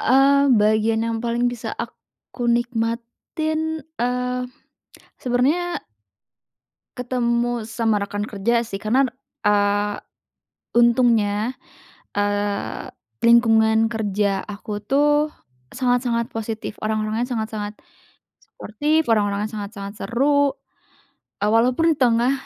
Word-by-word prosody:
Eee, 280 +2 +4
bagian 215 +1 +2
yang 230 -1 -1
paling 235 +1 0
bisa 245 -2 -5
aku 245 - -7
nikmatin, 240 +7 -2 0.2
eee, 250 +1 -1 0.8
sebenernya 290 +9 0 1.2
ketemu 240 -1 0
sama 225 -2 0
rekan 205 +1 -3
kerja 230 +3 0
sih 200 -3 -6
karena, 250 +6 +3
d 250 - -6 0.3
eee, 205 0 +2 0.8
untungnya, 235 -1 +3 0.5
eee, 205 0 -2 0.3
lingkungan 225 -1 +5
kerja 205 -3 -1
aku 210 0 -6
tuh 295 +5 +2 0.4
sangat-sangat 245 -2 0
positif, 220 -1 -4
orang-orangnya 215 +1 -1
sangat-sangat 220 -2 -3 0.7
suportif, 300 +8 -1
orang-orangnya 205 0 0
sangat-sangat 200 -1 -6
seru, 280 +3 +2 0.9
eee, 210 - +3
walaupun 250 +9 +3
di - - -3
tengah, 240 0 +3
230 Hz, 95 wpm, -22 LUFS, 210-250 Hz, 1.2 s, lingkungan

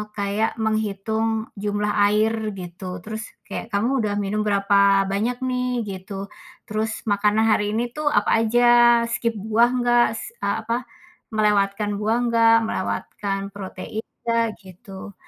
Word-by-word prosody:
kayak 205 +3 -1
menghitung 220 +1 -1
jumlah 210 0 -1 0.2
air, 215 +2 +2 0.3
gitu. 180 +1 -7
Terus, 220 +1 -5 0.2
kayak - - -5
kamu 235 +6 +1
udah 205 -1 -1
minum 205 +1 -1
berapa 200 -1 +3
banyak 225 +5 -1
nih? 250 0 -1 0.2
Gitu. 195 +1 -6 0.4
Terus 215 +1 -1 0.2
makanan 210 +2 +2
hari 210 0 +1
ini 240 +1 -1
tuh 305 -1 -3
apa 205 - +2
aja? 240 +2 +2 0.5
Skip 235 -1 -1
buah 220 +4 +3
nggak? 240 0 +4
S - - -7 0.2
a 200 +2 -1
apa, 235 +2 -1 0.5
melewatkan 205 -1 +1
buah 220 +2 +1
nggak? 230 -1 +5
Melewatkan 195 -1 -3
protein 200 +2 -6 0.2
nggak? 230 0 +2 0.2
Gitu. 195 +1 -11
210 Hz, 135 wpm, -23 LUFS, 200-225 Hz, 0.5 s, nggak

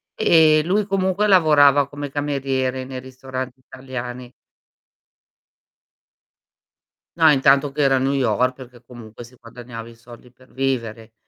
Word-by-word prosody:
ehm, 155 -2 +4
lui 200 +3 0
comunque 195 +1 0
lavorava 145 -6 +4
come 145 0 -7
cameriere 135 -3 -2
nei 130 0 -8
ristoranti 130 0 -8
italiani. 125 -1 -9 2.9
No, 160 -1 +5
intanto 140 0 +3
che 150 +1 -3
era 135 -1 +3
a - - 0
New 135 +2 0
York, 130 -1 0
perché 125 -2 -14
comunque 120 -1 -12
si 120 +2 -17
guadagnava 115 -1 -11
i 115 - -13
soldi 120 +1 -16
per 130 +1 -24
vivere, 115 -4 -4
130 Hz, 130 wpm, -20 LUFS, 125-145 Hz, 2.9 s, No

